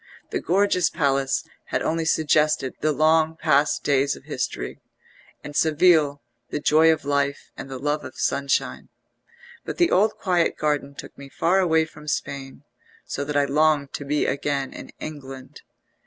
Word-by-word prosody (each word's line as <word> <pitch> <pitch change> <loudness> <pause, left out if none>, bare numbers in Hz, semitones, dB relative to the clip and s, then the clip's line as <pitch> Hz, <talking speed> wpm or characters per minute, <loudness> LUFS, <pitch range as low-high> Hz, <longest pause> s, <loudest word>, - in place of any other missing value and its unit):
The - - -1
gorgeous 185 0 +2
palace 135 -2 0 0.2
had - - -2
only 165 0 -1
suggested 155 -4 +2
the 155 - +2
long 160 +2 +2
past 150 -2 +2
days 140 0 +2
of - - -14
history, - - -4 0.6
and 145 - -9
Seville 155 -3 +3 0.3
the 150 - -3
joy 155 +2 +5
of 160 -3 -2
life 140 0 -1
and - - -8
the 135 - -6
love 145 +3 -2
of 130 - -9
sunshine; 140 0 -1 0.7
but - - -6
the 345 -1 +3
old 210 +3 +3
quiet 180 -4 +1
garden 145 -2 -1
took - - -10
me 140 0 -10
far 170 +8 +1
away 160 -3 +3
from 150 -1 -15
Spain, 140 -2 -4 0.4
so 145 - -4
that 145 0 -2
I 145 - +3
longed 145 0 +2
to - - -5
be 145 +1 0
again 140 -1 -2
in - - -9
England. 135 -2 -9
150 Hz, 160 wpm, -23 LUFS, 140-160 Hz, 0.7 s, joy